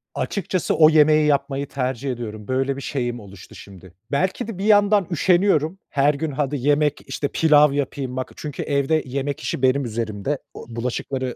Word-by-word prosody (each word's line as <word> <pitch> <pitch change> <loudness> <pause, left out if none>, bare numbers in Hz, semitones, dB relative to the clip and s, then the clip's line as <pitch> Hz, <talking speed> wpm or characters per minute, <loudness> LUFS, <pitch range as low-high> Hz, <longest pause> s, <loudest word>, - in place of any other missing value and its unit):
Açıkçası 185 -2 -1
o 155 -1 +7
yemeği 155 -1 +5
yapmayı 140 -1 0
tercih 130 0 -3
ediyorum. 110 -3 -7
Böyle 135 +1 0
bir 140 - -7
şeyim 120 -4 -3
oluştu 100 -2 -13
şimdi. 95 -2 -13 0.2
Belki 185 +8 -1
de 215 -5 -6
bir 195 - -3
yandan 205 -3 +4
üşeniyorum. 175 0 +2
Her 145 +1 +2
gün 150 +1 -3
hadi 145 +1 -2
yemek, 145 +2 +1
işte, 145 - -2
pilav 150 -2 +4
yapayım 135 -2 -3
bak 130 - -4
çünkü 150 -2 -6
evde 145 +2 +1
yemek 140 +2 -3
işi - - -4
benim 130 +1 +2
üzerimde. 115 +3 -3 0.2
U - - -10
bulaşıkları 125 +1 -3
140 Hz, 170 wpm, -22 LUFS, 130-155 Hz, 0.2 s, o